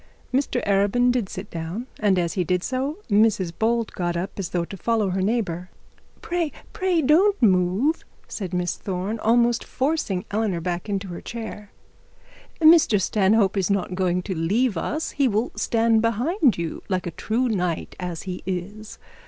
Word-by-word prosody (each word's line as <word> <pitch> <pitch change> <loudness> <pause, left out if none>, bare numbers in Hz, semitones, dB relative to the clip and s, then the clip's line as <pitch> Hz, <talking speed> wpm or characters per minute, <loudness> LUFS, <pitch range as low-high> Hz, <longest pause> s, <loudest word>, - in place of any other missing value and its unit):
Mr 260 -2 0
Arabin 205 +5 +3
did 240 -6 -1
sit 195 +2 -7
down, 170 +8 -4
and 205 -3 +3
as 170 -2 0
he 185 - 0
did 180 +1 0
so, 270 +5 -2
Mrs 205 -5 +2
Bold 230 0 +1
got 175 -1 -2
up 185 +4 -3
as 190 - -3
though 175 -1 -1
to 195 - -8
follow 215 0 0
her 190 +1 -1
neighbour. 185 -4 -1 0.5
'Pray, 345 -3 -1 0.2
pray 360 -4 +1
don't 380 +9 +4
move,' 195 - +2 0.2
said 190 -5 -5
Miss 180 -1 -1
Thorne, 195 +4 -3
almost 235 +2 +3
forcing 260 - -1
Eleanor 205 -4 0
back 175 +3 -3
into 200 -1 -2
her 175 - -7
chair. 220 -3 -7 0.9
'Mr 315 - +6
Stanhope 200 +1 +2
is 190 -1 +1
not 195 -2 0
going 180 -1 0
to 190 - -3
leave 200 +8 +1
us. 305 - -2
He 280 -2 +2
will 220 +2 0
stand 225 -1 +2
behind 245 - +2
you 170 -1 -4
like 185 -2 -1
a 175 - -3
true 235 +8 -1
knight 180 -7 -2
as 180 -3 -4
he 185 -2 -5
is. 200 +4 -5
205 Hz, 170 wpm, -24 LUFS, 180-240 Hz, 0.9 s, Mr